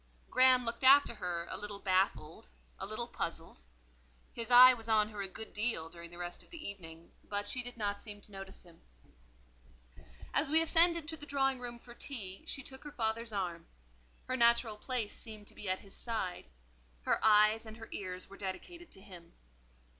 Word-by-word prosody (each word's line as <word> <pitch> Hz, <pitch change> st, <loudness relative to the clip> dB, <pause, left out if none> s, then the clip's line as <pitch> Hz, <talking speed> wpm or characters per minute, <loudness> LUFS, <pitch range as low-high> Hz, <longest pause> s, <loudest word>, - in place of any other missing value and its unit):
Graham 255 Hz, 0 st, +6 dB
looked 230 Hz, +3 st, -2 dB
after 275 Hz, -1 st, +7 dB
her 175 Hz, -5 st, -3 dB
a -, -, -4 dB
little 205 Hz, -1 st, -4 dB
baffled, 185 Hz, -, 0 dB, 0.3 s
a -, -, -4 dB
little -, -, -3 dB
puzzled; -, -, -5 dB, 0.7 s
his 230 Hz, 0 st, -5 dB
eye 250 Hz, +1 st, +10 dB
was 225 Hz, -2 st, -8 dB
on 215 Hz, -1 st, +3 dB
her 210 Hz, -2 st, -6 dB
a 195 Hz, -, -2 dB
good 220 Hz, +3 st, -7 dB
deal 210 Hz, -7 st, -1 dB
during 170 Hz, 0 st, -10 dB
the 175 Hz, -, -12 dB
rest 175 Hz, 0 st, -6 dB
of -, -, -17 dB
the 335 Hz, -3 st, -8 dB
evening, 165 Hz, -4 st, -10 dB
but 205 Hz, 0 st, -3 dB
she 250 Hz, -, +1 dB
did 245 Hz, 0 st, -9 dB
not 205 Hz, -2 st, -2 dB
seem 210 Hz, -2 st, -8 dB
to 205 Hz, -, -13 dB
notice 195 Hz, -1 st, -9 dB
him. 170 Hz, -2 st, -19 dB, 1.5 s
As 290 Hz, -, +1 dB
we 315 Hz, +2 st, +6 dB
ascended 330 Hz, 0 st, +4 dB
to 320 Hz, 0 st, -4 dB
the 295 Hz, 0 st, -11 dB
drawing 270 Hz, -2 st, +1 dB
room 240 Hz, -1 st, -5 dB
for 240 Hz, 0 st, -14 dB
tea, 205 Hz, -8 st, -5 dB
she 275 Hz, -, -2 dB
took 265 Hz, 0 st, -9 dB
her 295 Hz, -, -8 dB
father's 230 Hz, -2 st, -2 dB
arm: 175 Hz, -5 st, -3 dB, 0.6 s
her 255 Hz, -, -2 dB
natural 235 Hz, -2 st, +4 dB
place 230 Hz, -2 st, -3 dB
seemed 215 Hz, -3 st, -9 dB
to -, -, -12 dB
be 205 Hz, -, -6 dB
at 185 Hz, -, 0 dB
his 195 Hz, -, -12 dB
side; 215 Hz, -, -3 dB, 0.6 s
her -, -, +1 dB
eyes 215 Hz, +1 st, +5 dB
and 220 Hz, 0 st, -9 dB
her 225 Hz, -, -9 dB
ears 185 Hz, -2 st, -5 dB
were 195 Hz, -, -13 dB
dedicated 340 Hz, -, -7 dB
to 190 Hz, -, -13 dB
him. 175 Hz, -4 st, -13 dB
220 Hz, 190 wpm, -33 LUFS, 190-250 Hz, 1.5 s, eye